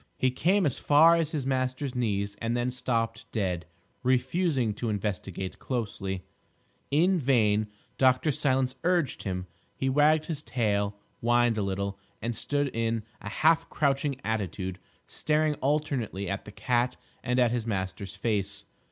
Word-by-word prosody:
He 130 - +2
came 185 +8 +2
as 140 - 0
far 155 +3 +6
as 165 -3 +1
his 150 -5 -3
master's 130 0 -1
knees 100 -5 -1
and 115 +1 0
then 120 +1 0
stopped 115 -2 -2
dead, 90 -6 -1 0.3
refusing 130 - +1
to 115 +2 -3
investigate 95 -3 -3
closely. 100 -6 -3 0.7
In 175 +6 +3
vain 110 -6 +3 0.3
Dr. 130 +3 +4
Silence 135 -3 +1
urged 170 -6 +1
him; 90 -3 -3 0.3
he 135 +5 0
wagged 150 +2 +4
his 155 -4 -3
tail, 105 -5 0 0.2
whined 120 -2 +3
a - - +1
little, 100 0 -2 0.2
and 115 +1 -3
stood 145 +3 -1
in 115 -1 0 0.2
a 100 - -5
half 160 +9 +3
crouching 140 -1 0
attitude, 95 -4 -2 0.3
staring 155 0 +1
alternately 135 - 0
at 100 - -3
the 105 - -9
cat 120 +3 0 0.3
and 125 0 0
at 120 -2 +4
his 120 -2 -2
master's 95 -1 -3
face. 100 -1 -1
120 Hz, 145 wpm, -28 LUFS, 105-140 Hz, 0.7 s, far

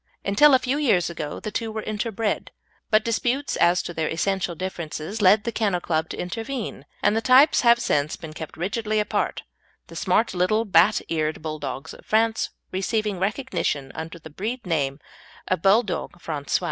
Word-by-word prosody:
Until 270 +8 +6
a - - +7
few 260 +3 -1
years 190 - +2
ago 150 -3 -5
the 215 - -5
two 225 0 -3
were 220 0 -4
interbred, 215 0 -2 0.4
but 215 0 +3
disputes 245 +4 0
as 175 +1 +3
to 175 - -6
their 160 -1 -1
essential 180 +1 -1
differences 175 +2 -5
led 205 +2 +6
the 235 - -2
Kennel 205 -5 0
Club 160 -2 -1
to - - -6
intervene 225 +6 -5 0.2
and 210 - +3
the 225 - +1
types 260 +6 +6
have 235 -1 +6
since 150 -9 0
been 160 -2 -9
kept 155 0 -8
rigidly 215 +5 -1
apart, 210 - -1 0.5
the - - -11
smart 225 - +1
little 190 +5 +1
bat 205 +1 +4
eared 155 -1 -2
Bulldogs 145 -4 -5
of - - -14
France 225 +1 +1 0.2
receiving 205 +1 -1
recognition 195 - -1
under 165 +1 -6
the 160 -1 -12
breed 225 - -4
name 140 -6 0 0.5
of 185 -3 0
Bouledogues 195 -2 +1
Francais. 145 -4 -2
195 Hz, 170 wpm, -24 LUFS, 165-225 Hz, 0.5 s, a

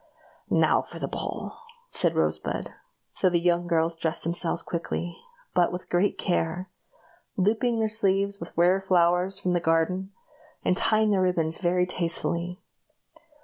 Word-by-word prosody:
"Now - - +3
for - - -11
the - - -3
ball!" - - -5 0.3
said - - +2
Rosebud. - - -1 0.4
So 185 - +2
the 175 -1 +2
young 175 0 +1
girls 165 -1 +1
dressed 165 -1 -2
themselves 170 0 +1
quickly, 170 0 -4 0.4
but 175 - +3
with 180 +1 -7
great 180 +3 +2
care 175 0 -1 0.7
looping 225 +5 +1
their 220 -1 +1
sleeves 200 -2 +1
with 170 - -7
rare 180 +3 +4
flowers 180 0 +2
from 180 -2 -1
the 175 - +2
garden, 170 +4 0 0.5
and 180 - +3
tying 215 +2 +2
their 195 -2 +2
ribbons 165 -3 +1
very 180 0 +2
tastefully. 175 0 -1
180 Hz, 145 wpm, -26 LUFS, 170-190 Hz, 0.7 s, rare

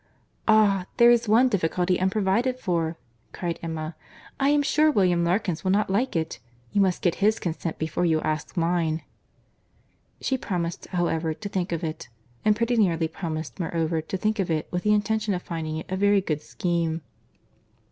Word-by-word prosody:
"Ah! 205 -4 +4
there 240 0 +7
is 235 -1 +3
one 230 +5 +5
difficulty 180 -3 +1
unprovided 205 +6 +1
for," 170 -7 -1 0.4
cried 170 -2 -3
Emma. 160 -1 -4 0.4
"I 275 0 +3
am 290 0 +3
sure 305 +2 +3
William 180 - +3
Larkins 175 -1 0
will 190 - 0
not 200 +1 +2
like 240 +5 0
it. 160 -7 -2 0.3
You 200 - +2
must 185 -2 +1
get 175 - +3
his 215 +2 +4
consent 165 -1 -3
before 160 +2 -2
you 160 -2 +3
ask 155 +3 -3
mine." 165 -2 +1 1.2
She 265 -1 -1
promised, 175 -6 -3
however, 165 -3 -1
to 205 +4 -6
think 185 -2 -2
of 170 -1 -2
it; 160 -1 -5 0.3
and 215 0 +4
pretty 230 +2 0
nearly 170 -6 +2
promised, 160 -1 -5
moreover, 165 -1 -1
to 175 +4 -4
think 215 +3 -1
of 190 - 0
it, 155 -2 -1
with 180 - -1
the 210 - +2
intention 210 -1 +1
of 180 - -5
finding 160 -2 -4
it 160 - -6
a 190 - -3
very 205 +1 +4
good 155 -6 -2
scheme. 170 -2 -1
180 Hz, 175 wpm, -25 LUFS, 165-210 Hz, 1.2 s, there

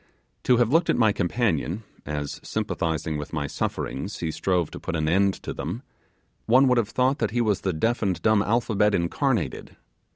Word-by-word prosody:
To 125 - +5
have 120 +2 +2
looked 165 +1 +3
at - - +4
my 110 -3 +4
companion, 95 - -1 0.2
as, 75 -1 -4
sympathizing 80 -2 -2
with 75 +2 -7
my 75 -2 -1
sufferings, 70 +5 -3
he 80 -2 -2
strove 85 +1 0
to - - -8
put 85 - -4
an 80 -1 0
end 95 +4 +3
to - - -4
them, - - -5 0.6
one 130 +4 +6
would 125 -1 +4
have 110 -2 -1
thought 130 +3 +1
that 115 - +1
he 120 - -1
was 110 -4 +1
the 95 - 0
deaf 115 +9 0
and 95 -5 0
dumb 110 -2 +4
alphabet 105 -2 +2
incarnated. 105 - -1
100 Hz, 190 wpm, -25 LUFS, 80-120 Hz, 0.6 s, one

